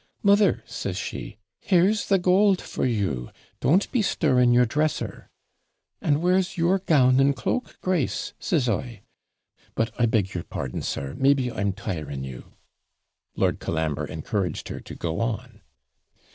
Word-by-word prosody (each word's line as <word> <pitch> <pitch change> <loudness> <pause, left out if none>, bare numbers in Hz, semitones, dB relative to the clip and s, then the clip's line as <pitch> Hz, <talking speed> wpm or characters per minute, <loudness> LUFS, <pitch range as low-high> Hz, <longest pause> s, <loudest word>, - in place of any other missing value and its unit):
"Mother," 200 0 +4
says - - -4
she, - - -6 0.2
"here's 195 +3 +2
the 195 - +4
gold 185 +1 +4
for - - -2
you! 95 - -1 0.3
don't 180 +8 +2
be 245 - +2
stirring 130 -11 +3
your 125 +1 +5
dresser." 145 -4 -2 0.7
"And 150 +2 +1
where's 180 0 +2
your 180 +3 +2
gown 135 -8 +4
and 140 +1 +4
cloak, 250 - -3
Grace?" 180 -8 -1
says 145 -8 0
I. 115 -1 -3 0.7
But 115 +1 -1
I 120 - +5
beg 105 -4 0
your 85 - -3
pardon, 65 - -5
sir; 70 0 -4
maybe 135 -2 +3
I'm 100 -3 -1
tiring 75 -8 -5
you?' 65 -2 -9 0.8
Lord - - +1
Colambre 80 -3 -2
encouraged 95 -6 -3
her - - -5
to - - -10
go 85 -1 -3
on. 115 -2 -3
125 Hz, 145 wpm, -25 LUFS, -, 0.8 s, your